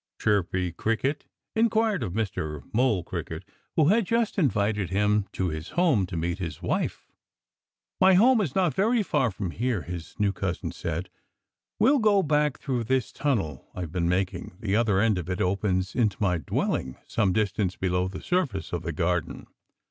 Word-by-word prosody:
Chirpy 95 -3 +1
Cricket 115 - -1 0.3
inquired 220 -3 +2
of 90 - -3
Mr. 80 -9 -3
Mole 110 -6 +2
Cricket, 85 0 -6 0.3
who 155 -1 +4
had 215 -1 +3
just 230 -3 +1
invited 105 - +1
him 105 +1 +2
to 95 -1 -1
his 80 +1 -5
home 145 - +3
to 85 - -5
meet 85 +3 -2
his 85 -4 -5
wife. - - -2 0.9
"My 190 0 +6
home 235 +4 +5
is 155 -10 -2
not 180 -6 +2
very 220 - +2
far 130 -9 +1
from 95 -3 -4
here," 115 -3 -1
his 85 +1 -8
new 100 -1 +2
cousin 90 -2 -3
said. 85 +3 -4 0.7
"We'll 275 +4 +4
go 205 -3 +4
back 150 -1 +1
through 125 -5 -2
this 130 +1 0
tunnel 100 - -2
I've 90 -4 -5
been 85 -1 0
making. 90 -1 -2
The 100 -2 0
other 110 -4 +3
end 105 -3 +3
of 85 0 -6
it 90 - -2
opens 95 0 0
into 110 -6 +1
my 90 -5 +1
dwelling, 65 -2 -2
some 100 -4 +1
distance 95 -2 0
below 90 0 0
the 95 0 -7
surface 150 - -1
of 85 - -1
the 85 0 -3
garden. 85 +1 -1
100 Hz, 170 wpm, -26 LUFS, 90-140 Hz, 0.9 s, My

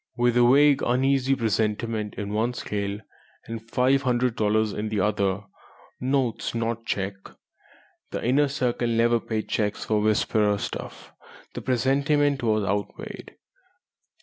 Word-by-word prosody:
With 120 0 +2
a 120 0 +5
vague, 145 0 +5
uneasy 135 +2 +2
presentiment 110 -2 -1
in 100 0 -4
one 115 +3 0
scale, 100 -2 -3 0.4
and 115 0 -8
five 130 +3 +3
hundred 125 -2 +1
dollars 110 0 +1
in 105 +1 -3
the 105 -1 -1
other 100 0 0 0.6
(notes, 130 -3 -1
not 115 0 -1
a - - -32
cheque; 95 -1 -3 0.8
the - - -4
Inner 140 +4 +3
Circle 125 -4 -1
never 115 0 +3
paid 110 -2 -3
cheques 105 -1 -1
for 105 -1 +1
"Whisperer" 105 -1 +2
stuff) - - -7 0.4
the - - -5
presentiment 140 +2 +1
was 110 -3 +1
outweighed. 100 0 -4
115 Hz, 135 wpm, -25 LUFS, 105-125 Hz, 0.8 s, a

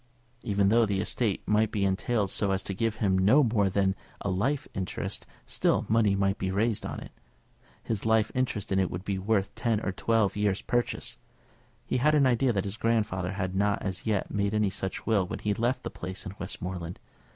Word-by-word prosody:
Even 100 -4 +2
though 115 +2 +5
the 100 -3 0
estate 105 0 -1
might 105 +1 +3
be 100 -2 0
entailed 100 +1 0
so 100 - +1
as 95 0 0
to 95 - -3
give 115 +3 0
him 95 -4 +1
no 125 +11 +5
more 110 -5 +2
than 95 0 +2 0.3
a 100 - -1
life 135 +10 0
interest, 95 -1 -4 0.2
still - - +1
money 110 -2 +3
might 100 0 +1
be 95 - -1
raised 105 +3 0
on - - -5
it. - - -10 0.7
His 110 -3 -2
life 110 -1 +3
interest 120 -6 -1
in 95 - +3
it 95 - +1
would 90 +3 -6
be 100 -1 -1
worth 100 0 0
ten 115 -2 0
or 100 - -1
twelve 110 0 +1
years' 105 -2 0
purchase. 120 0 -1 0.7
He - - 0
had 150 +5 +3
an 145 -2 +5
idea 125 0 +3
that 100 -4 0
his 100 +1 -4
grandfather 105 -6 0
had 95 -2 -2
not 100 +1 +1
as 95 +2 -4
yet 105 -3 0
made 100 +1 0
any 105 -2 +2
such 95 -1 -4
will 100 -5 +2
when - - -4
he 105 - -1
left 120 +5 0
the - - -4
place 95 +4 -7
in 100 - -6
Westmoreland. 90 -1 -5
100 Hz, 205 wpm, -28 LUFS, 95-115 Hz, 0.7 s, though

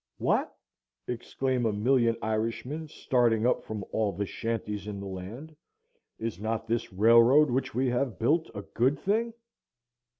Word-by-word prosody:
"What!" - - +1 0.6
exclaim 125 0 -1
a - - +1
million 115 +2 +2
Irishmen 115 +8 -2
starting 120 -6 +1
up 125 - +2
from 105 -3 -5
all 110 -2 +1
the 100 +2 -3
shanties 105 -1 -4
in 100 -2 -5
the 100 - -6
land, 100 +12 -8 0.6
"is 110 -5 -4
not 110 +1 -2
this 115 0 -1
railroad 115 +8 +6
which 130 -1 -1
we 130 +2 +1
have 125 0 -1
built 155 +8 +1
a 100 - -5
good 130 +8 +1
thing?" 220 +8 0
115 Hz, 145 wpm, -28 LUFS, 110-130 Hz, 0.6 s, railroad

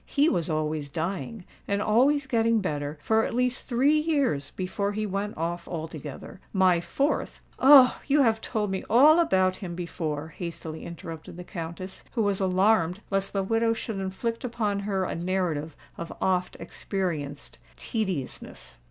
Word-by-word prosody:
"He 290 +2 +3
was 175 - 0
always 155 -2 -1
dying—and 190 +4 -4
always 265 +7 +3
getting 230 -3 +2
better, 150 -5 -3
for 220 0 +3
at - - -2
least 250 0 0
three 275 +5 +3
years 280 - 0
before 200 +2 -2
he 215 +1 -2
went 200 +1 -3
off 170 +2 -3
altogether. 155 -1 -7
My 185 -3 +4
fourth——" 280 - -1 0.2
"Oh! 265 -1 +8
you 290 0 +4
have 225 -2 +2
told 210 -4 -2
me 190 - -2
all 295 +8 +7
about 185 - +3
him 175 -4 -6
before," 160 -3 -4
hastily 165 -1 -6
interrupted 165 -1 -8
the 180 - -7
Countess, 175 +1 -7
who 230 - +1
was 200 -2 +1
alarmed 185 -1 +2
lest 195 0 0
the 195 -1 0
widow 225 +3 +2
should 220 -2 -4
inflict 195 +5 -3
upon 220 -5 -1
her 200 -1 -1
a - - -2
narrative 170 -4 -2 0.2
of 170 - -5
oft 180 -1 0
experienced 155 -8 -4 0.2
tediousness. 145 - -4
190 Hz, 150 wpm, -27 LUFS, 170-225 Hz, 0.2 s, Oh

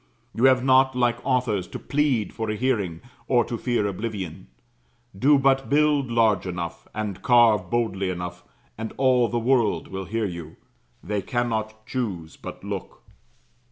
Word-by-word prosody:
You 120 - +2
have 130 -1 +5
not, 130 0 +4
like 120 -1 +1
authors, 120 -8 0
to - - -7
plead 140 -7 0
for 110 -1 -3
a 105 - -1
hearing, 105 -9 -1 0.3
or 120 -3 +3
to 120 - -4
fear 120 -2 0
oblivion. 100 -4 -4 0.7
Do 140 +9 +4
but 135 0 +2
build 145 -2 +3
large 110 -5 +2
enough, 85 -2 -5
and 105 -3 -4
carve 115 -7 +4
boldly 105 -5 0
enough, 90 0 -5 0.4
and 110 0 -5
all 130 -2 +4
the 120 - -2
world 115 -7 +1
will 95 0 -5
hear 110 +4 -1
you; 85 -4 -6 0.5
they 105 +1 -2
cannot 110 -1 -2
choose 95 -11 -4
but - - -9
look. - - -6
115 Hz, 155 wpm, -24 LUFS, 95-125 Hz, 0.7 s, have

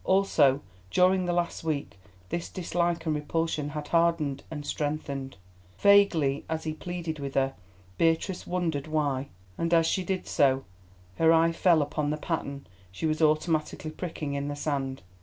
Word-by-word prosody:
Also, 160 -8 +3 0.3
during 185 - +3
the 175 - 0
last 175 -1 -1
week 150 -10 -3 0.3
this 170 - -3
dislike 170 -2 -1
and 160 - +1
repulsion 150 0 -1
had 150 0 -6
hardened 165 -5 +2
and 150 -2 -6
strengthened. 140 -5 -3 0.4
Vaguely, 180 -9 +4
as 160 0 -2
he 155 - -2
pleaded 170 -1 -5
with 140 -1 -5
her, 135 0 +2 0.5
Beatrice 165 +3 +1
wondered 165 -5 -1
why, 145 -3 0 0.3
and 170 0 0
as 165 -1 +4
she 185 +3 +1
did 185 0 -2
so 135 -1 +2 0.5
her 165 0 +5
eye 165 0 +5
fell 165 -2 +4
upon 145 0 -2
the 150 - -1
pattern 140 -3 -4 0.3
she 95 - -4
was 155 0 0
automatically 155 0 +1
pricking 155 -4 -5
in 140 0 -2
the 145 - -3
sand. 135 -5 -2
155 Hz, 160 wpm, -28 LUFS, 145-170 Hz, 0.5 s, her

